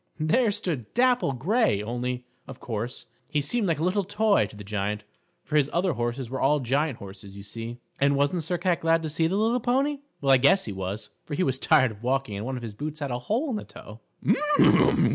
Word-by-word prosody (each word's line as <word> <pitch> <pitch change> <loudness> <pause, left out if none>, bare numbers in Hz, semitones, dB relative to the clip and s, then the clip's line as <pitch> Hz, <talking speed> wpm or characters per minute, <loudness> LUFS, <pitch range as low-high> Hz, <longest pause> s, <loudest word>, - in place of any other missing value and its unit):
There 220 +10 +3
stood 160 - -3
Dapple 250 - +3
Gray, 155 - +1
only, 125 +2 -3 0.2
of - - -10
course, 115 +2 -5 0.2
he 150 - +1
seemed 205 +9 0
like 165 - +1
a 155 - -2
little 190 +3 +1
toy 205 +2 +2
to - - -14
the 105 - -9
Giant, 105 +1 -2 0.4
for 155 - 0
his 145 -1 +3
other 175 0 +1
horses 120 +1 -2
were 130 +3 -4
all 145 +2 +3
giant 135 +1 0
horses, 100 0 -11
you 100 - -9
see. 115 +3 -6 0.2
And 140 0 +3
wasn't 145 +5 +1
Sir 175 +3 -1
Cat 175 0 +1
glad 165 0 +2
to 160 - -2
see 160 +2 +1
the 185 - -1
little 225 +4 +2
pony? 275 +4 +1 0.2
Well, 135 -1 +2
I 135 - +8
guess 140 +9 +4
he 105 - -4
was, 95 +3 -5
for 150 - -5
he 185 - +1
was 130 -3 0
tired 130 -9 +3
walking 130 -3 -1
and 105 +4 -4
one 130 -1 -3
of 120 - -7
his 110 -3 -6
boots 150 +6 -5
had 140 -3 -3
a 120 - -2
hole 240 - -1
in 220 - -1
the - - -5
toe. 105 +2 -12
140 Hz, 225 wpm, -26 LUFS, 120-180 Hz, 0.4 s, I